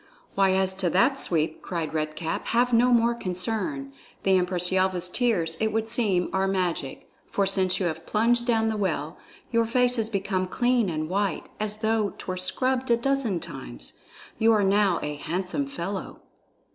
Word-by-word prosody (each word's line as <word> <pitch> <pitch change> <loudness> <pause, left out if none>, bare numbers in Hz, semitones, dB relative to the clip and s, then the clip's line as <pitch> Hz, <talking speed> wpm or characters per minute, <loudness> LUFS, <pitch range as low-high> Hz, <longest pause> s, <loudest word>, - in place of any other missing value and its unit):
"Why 195 -1 +3
as 190 0 +2
to 185 -2 +1
that, 235 - +3
Sweep," 160 -2 0
cried 165 -4 -4
Red 155 -1 -2
Cap, 165 -1 -3
"have 245 +2 +2
no 245 +2 +5
more 235 0 +4
concern. 180 -9 -2 0.3
The 190 -1 +4
Empress 180 -1 +2
Yelva's 185 -1 +1
tears, 180 -6 +1
it 220 0 +1
would 225 0 -1
seem, 210 -6 +1
are 190 0 +1
magic, 180 -8 -2 0.2
for 200 - +1
since 190 -1 +1
you 190 - 0
have 165 -1 -4
plunged 235 +3 +2
down 225 -2 +2
the 220 - -2
well, 160 -5 -2 0.3
your 230 -1 +2
face 250 +1 +2
is 220 0 -1
become 195 -3 -1
clean 240 0 +1
and 155 -1 -2
white 195 0 -1
as 215 0 -2
though 220 -2 0
'twere 185 -1 -5
scrubbed 255 +7 0
a 235 - +4
dozen 245 -7 0
times. 60 - -8 0.4
You 225 +1 +5
are 210 -2 +3
now 195 -2 +3
a 150 0 -4
handsome 185 - -2
fellow." 200 -8 -5
195 Hz, 175 wpm, -26 LUFS, 180-230 Hz, 0.4 s, no